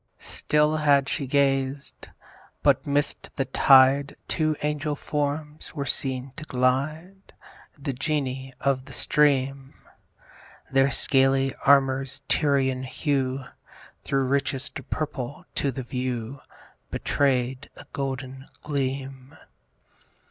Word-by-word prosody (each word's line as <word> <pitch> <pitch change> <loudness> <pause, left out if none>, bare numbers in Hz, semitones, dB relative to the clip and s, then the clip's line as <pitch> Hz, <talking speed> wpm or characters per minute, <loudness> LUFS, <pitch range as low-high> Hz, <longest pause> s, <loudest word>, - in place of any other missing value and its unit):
Still 150 +1 +2
had 140 -2 +3
she 140 - -2
gazed; 135 0 0 0.6
but - - +3
'midst 145 0 -1
the 135 - 0
tide 135 +1 +5
Two 155 -1 +1
angel 150 0 -1
forms 150 +1 -3
were 140 -2 -2
seen 130 0 -2
to 155 - -6
glide, 155 +9 -1 0.4
The 140 -1 -3
Genii 135 -2 -2
of 135 -1 0
the 135 - -11
stream: 135 -2 +1 1.0
Their 135 0 +4
scaly 135 0 +2
armour's 135 -1 +3
Tyrian 135 -3 +2
hue 130 -1 -1 0.6
Thro' 135 0 0
richest 135 0 -1
purple 140 -3 -4
to 140 - 0
the 130 +1 -5
view 125 0 -4 0.5
Betray'd 130 -1 0
a - - -12
golden 135 -1 -4 0.2
gleam. 135 -2 -4
135 Hz, 105 wpm, -25 LUFS, 130-145 Hz, 1.0 s, tide